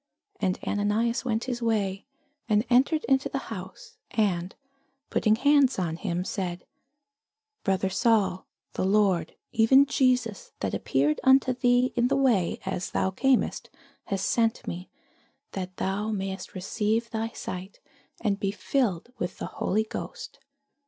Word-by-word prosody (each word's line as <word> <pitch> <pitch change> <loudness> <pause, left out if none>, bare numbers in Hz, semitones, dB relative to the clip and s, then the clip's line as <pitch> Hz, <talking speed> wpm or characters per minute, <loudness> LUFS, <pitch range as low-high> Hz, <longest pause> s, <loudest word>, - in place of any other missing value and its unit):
And 185 0 0
Ananias 210 +4 0
went 230 -3 -1
his 245 -2 -3
way, 205 -4 -1 0.4
and 210 +2 +3
entered 275 +6 +4
into 270 -1 +2
the - - -2 0.2
house; 190 -1 -10
and 185 -4 0 0.6
putting 215 0 +3
his 230 - -12
hands 285 -2 +5
on 170 -4 -1
him 175 +1 -2
said, 180 -3 -4 1.0
Brother 190 0 +1
Saul, 200 -3 +2 0.3
the - - -2
Lord, 190 -4 +2 0.2
even 265 +5 +6
Jesus, 250 -6 0
that 100 - -1
appeared 145 +3 +1
unto 265 -1 +5
thee 245 0 +2
in 240 0 +3
the - - +1
way 240 -10 +2
as 190 -1 -3
thou 190 - 0
camest, 265 +7 +1 0.4
hath 195 -2 -2
sent 225 +3 +1
me, 180 +2 -6 0.6
that 185 -1 -5
thou 200 +3 -1
mightest 195 -3 -4
receive 215 +5 -1
thy 225 0 -2
sight, 185 -3 -7 0.4
and 205 -3 0
be 195 - 0
filled 205 -1 -1
with 180 -4 -3
the - - -4 0.2
Holy 215 +2 +2
Ghost. 470 - -7
210 Hz, 140 wpm, -27 LUFS, 190-245 Hz, 1.0 s, even